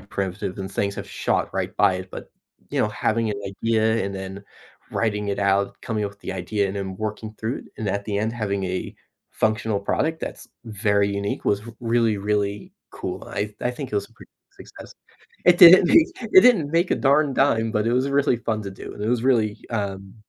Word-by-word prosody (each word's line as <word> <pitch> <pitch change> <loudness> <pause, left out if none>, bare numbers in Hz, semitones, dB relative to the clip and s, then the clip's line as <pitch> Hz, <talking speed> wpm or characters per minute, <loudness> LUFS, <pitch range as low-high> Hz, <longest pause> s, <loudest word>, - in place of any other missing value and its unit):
primitive 95 -1 -4
and 95 0 -5
things 100 0 -1
have - - -7
shot - - -1
right - - -2
by 95 - +4
it, 95 0 -6
but, - - -9 0.4
you - - 0
know, - - +2
having 110 +1 0
an 100 -1 -4
idea 110 +2 0
and 100 0 -4
then 95 +1 -7 0.5
writing 105 -2 -1
it 100 - -2
out, 100 0 +1
coming 110 -2 -2
up 100 - -3
with 100 - -25
the - - -5
idea, 100 +2 -1
and 95 +1 -5
then 95 -1 -4
working 110 +1 -5
through 115 +3 -2
it, - - -12
and 110 - -2
at 100 +1 -2
the 100 -1 -2
end, 110 +2 -1
having 100 -4 -2
a 90 0 -4 0.4
functional 110 -1 0
product 160 +10 -1
that's - - -7 0.2
very 100 -2 +1
unique 100 0 -3
was 100 0 +1 0.2
really, 115 -2 +1
really 100 0 -2 0.2
cool. - - -6
I 105 +1 -3
I 125 - 0
think 130 0 -7
it - - -2
was 100 - -2
a - - -25
pretty - - -17 0.2
success. - - -13 0.5
It 175 -1 +6
didn't 180 0 +9
make 325 - +6
it 210 -4 +7
didn't 185 -13 +4
make 170 +2 +1
a - - +1
darn 140 0 +3
dime, 115 -5 +2
but 105 +1 0
it 115 - +2
was 130 +3 +1
really 140 -2 +2
fun 110 -2 -2
to 100 - -6
do, 95 - -9
and 105 - -8
it 105 - -1
was 120 -1 +1
really, 110 -5 +1
um 100 -3 -4
105 Hz, 215 wpm, -23 LUFS, 100-115 Hz, 0.5 s, didn't